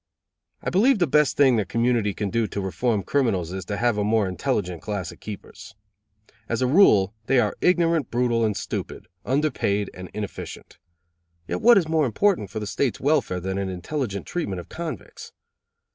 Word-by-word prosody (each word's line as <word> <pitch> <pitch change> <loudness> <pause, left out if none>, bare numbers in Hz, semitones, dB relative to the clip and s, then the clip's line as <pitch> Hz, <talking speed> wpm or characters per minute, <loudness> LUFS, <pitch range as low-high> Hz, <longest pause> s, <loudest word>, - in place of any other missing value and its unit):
I - - -2
believe 235 +8 +4
the 180 - +3
best 150 0 +2
thing 135 -4 +5
the 105 - +2
community 115 0 0
can 100 -2 -3
do 115 -2 +1
to 100 - -5
reform 100 +2 -1
criminals 105 - 0
is 95 -1 -5
to 100 +2 -3
have 120 -2 +1
a - - +1
more 105 -1 +2
intelligent 90 - -2
class 100 -5 -4
of - - -15
keepers. 105 -2 -10 0.7
As 115 - -1
a - - +3
rule 120 - +5
they 135 - +4
are 105 -4 +1
ignorant, 170 -5 +2
brutal 120 -1 +1
and 105 -2 0
stupid, - - -5 0.2
under 145 +4 +1
paid 100 0 -1
and 90 0 -9
inefficient; 105 -2 -7 0.7
yet - - -3
what 235 0 +7
is 175 -5 +2
more 160 -3 +2
important 165 - +1
for 105 - -5
the 105 - -4
State's 125 +4 -1
welfare 135 -10 +1
than 95 +2 -3
an 95 -1 -2
intelligent 100 - -4
treatment 100 - -3
of 85 - -10
convicts? 160 - -7
115 Hz, 185 wpm, -24 LUFS, 100-145 Hz, 0.7 s, what